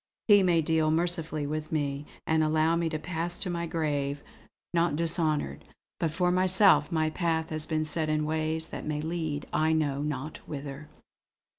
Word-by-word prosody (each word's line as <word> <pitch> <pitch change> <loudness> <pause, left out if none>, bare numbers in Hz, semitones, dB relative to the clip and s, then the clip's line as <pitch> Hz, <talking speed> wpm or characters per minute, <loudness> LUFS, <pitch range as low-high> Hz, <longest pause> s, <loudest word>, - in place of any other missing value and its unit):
He 205 -2 +7
may 175 -3 +3
deal 160 0 +2
mercifully 160 -2 -1
with 155 +1 -4
me, 145 -2 -2 0.2
and 160 0 +2
allow 155 +1 +2
me 170 -1 0
to 155 - -2
pass 170 +2 -3
to 180 - -1
my 170 0 -2
grave 145 -3 -2 0.5
not 170 -3 +2
dishonoured; 155 - 0 0.4
but 165 - +1
for 180 +3 +1
myself 185 +2 +4
my 155 -1 +1
path 160 -2 -1
has 155 0 -2
been 155 -1 0
set 155 0 0
in 155 0 +1
ways 160 +1 -1
that - - -6
may 150 -1 -2
lead 160 -2 -3
I 155 +1 +2
know 145 -3 0
not 150 0 -4
whither." 145 0 -7
155 Hz, 170 wpm, -28 LUFS, 150-170 Hz, 0.5 s, He